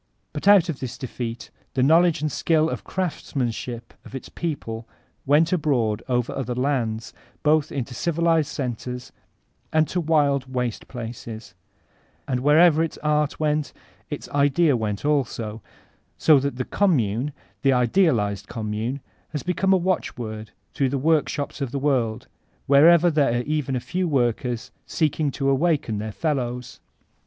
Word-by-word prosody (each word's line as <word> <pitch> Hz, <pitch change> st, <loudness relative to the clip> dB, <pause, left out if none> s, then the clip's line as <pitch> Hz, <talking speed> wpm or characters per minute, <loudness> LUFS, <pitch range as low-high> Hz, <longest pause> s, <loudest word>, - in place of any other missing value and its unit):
But 150 Hz, +6 st, -4 dB
out 200 Hz, -3 st, +7 dB
of 160 Hz, -6 st, -4 dB
this 130 Hz, -1 st, -5 dB
defeat 120 Hz, -2 st, -6 dB, 0.2 s
the 130 Hz, -, +2 dB
knowledge 165 Hz, +2 st, +4 dB
and 155 Hz, -, 0 dB
skill 160 Hz, +1 st, +2 dB
of -, -, -5 dB
craftsmanship 125 Hz, -9 st, -3 dB
of -, -, -11 dB
its 135 Hz, -, -7 dB
people 115 Hz, -9 st, -4 dB, 0.4 s
went 155 Hz, +5 st, +4 dB
abroad 125 Hz, -, +1 dB
over 125 Hz, -1 st, 0 dB
other 125 Hz, -2 st, -3 dB
lands, 120 Hz, -4 st, -1 dB, 0.3 s
both 155 Hz, 0 st, +3 dB
into 130 Hz, -2 st, -4 dB
civilized 165 Hz, +2 st, +1 dB
centers 125 Hz, -1 st, -5 dB, 0.6 s
and 155 Hz, -1 st, +3 dB
to 180 Hz, -, -1 dB
wild 140 Hz, -5 st, +1 dB
waste 125 Hz, -3 st, -3 dB
places; 115 Hz, -3 st, -8 dB, 0.7 s
and 125 Hz, -2 st, 0 dB
wherever 155 Hz, +4 st, +5 dB
its 165 Hz, -, -2 dB
art 150 Hz, -1 st, +1 dB
went, 150 Hz, -1 st, 0 dB, 0.4 s
its -, -, -5 dB
idea 145 Hz, +1 st, +3 dB
went 105 Hz, 0 st, -3 dB
also, 120 Hz, -7 st, -1 dB, 0.6 s
so 155 Hz, -3 st, +6 dB
that 140 Hz, -1 st, -2 dB
the 130 Hz, 0 st, -3 dB
''Commune,'' 135 Hz, -, +1 dB, 0.3 s
the 135 Hz, -, +4 dB
idealized 125 Hz, -, +2 dB
Commune, 110 Hz, +4 st, -3 dB, 0.3 s
has 150 Hz, -, -3 dB
become 180 Hz, +2 st, +1 dB
a 190 Hz, -, +6 dB
watchword 120 Hz, -, -3 dB, 0.2 s
through 135 Hz, -2 st, +1 dB
the 140 Hz, -, -1 dB
workshops 150 Hz, 0 st, 0 dB
of 135 Hz, -, -1 dB
the 140 Hz, -, -4 dB
world, 125 Hz, -5 st, 0 dB, 0.4 s
wherever 170 Hz, +5 st, +6 dB
there 145 Hz, -6 st, +2 dB
are 120 Hz, -, -1 dB
even 145 Hz, -2 st, -1 dB
a -, -, 0 dB
few 180 Hz, +7 st, -2 dB
woricers 120 Hz, -3 st, -1 dB, 0.2 s
seeking 155 Hz, -1 st, 0 dB
to 135 Hz, 0 st, -2 dB
awaken 140 Hz, -6 st, +1 dB
their 110 Hz, +1 st, -4 dB
fellows. 125 Hz, -3 st, -3 dB
140 Hz, 145 wpm, -24 LUFS, 120-155 Hz, 0.7 s, out